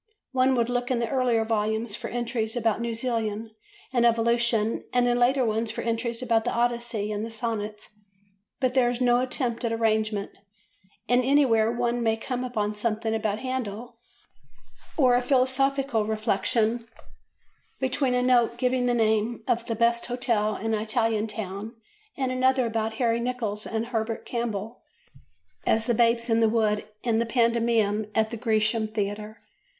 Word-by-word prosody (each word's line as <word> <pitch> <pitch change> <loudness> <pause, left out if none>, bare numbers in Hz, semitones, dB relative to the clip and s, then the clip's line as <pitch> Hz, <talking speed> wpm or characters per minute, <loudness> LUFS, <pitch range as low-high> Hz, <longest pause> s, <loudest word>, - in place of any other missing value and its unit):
One 260 0 +3
would 235 -2 +1
look 245 0 -1
in 255 - +1
the 235 0 -1
earlier 245 -4 +2
volumes 220 0 -1
for - - -5
entries 235 -2 -2
about 230 -2 0
New 235 -1 -2
Zealand 225 -2 -2 0.4
and 240 -2 +3
evolution 235 -1 +2
and 245 0 +2
in 245 - +3
the 240 - 0
later 255 +1 +3
ones 220 +1 -1
for 220 - -4
entries 230 +1 -2
about 230 -2 +2
the - - -1
Odyssey 235 -3 -1
and 210 0 -3
the 225 - -4
Sonnets, 220 -2 -4 0.7
but 255 -2 +1
there 255 -2 +3
is 245 0 -3
no 245 -1 +3
attempt 250 -2 -1
at 235 - 0
arrangement 220 -2 0 0.8
and 245 +1 +3
anywhere 245 -5 +3
one 240 0 -1
may 225 -1 +1
come 250 +2 -4
upon 215 -4 -2
something 220 +1 -1
about 215 -2 -1
Handel, 240 -2 -5 1.0
or 255 -5 +5
a 245 - +3
philosophical 265 -1 +1
reflection, 220 +2 0 0.9
between 260 0 +1
a 250 - +1
note 240 -2 +3
giving 250 0 +1
the 245 - +2
name 220 0 +1
of 235 0 0
the 230 - -1
best 235 +1 +2
hotel 230 -4 0
in 225 +2 -2
an 215 - 0
Italian 225 -1 0
town 210 +1 -5 0.4
and 260 -2 -1
another 260 0 +2
about 225 -1 -1
Harry 230 0 +1
Nicholls 235 -4 -3
and 225 0 -2
Herbert 225 -1 -3
Campbell 230 -1 -4 0.9
as 225 0 +2
the 240 - +2
Babes 235 0 +2
in 225 -1 +2
the 225 -1 +4
Wood 215 -2 +1 0.2
in 230 -2 +1
the 235 - +1
pantomime 230 -3 +1
at 220 0 +2
the 230 - -4
Grecian 220 -1 +1
Theatre. 210 0 -4
230 Hz, 165 wpm, -26 LUFS, 220-245 Hz, 1.0 s, or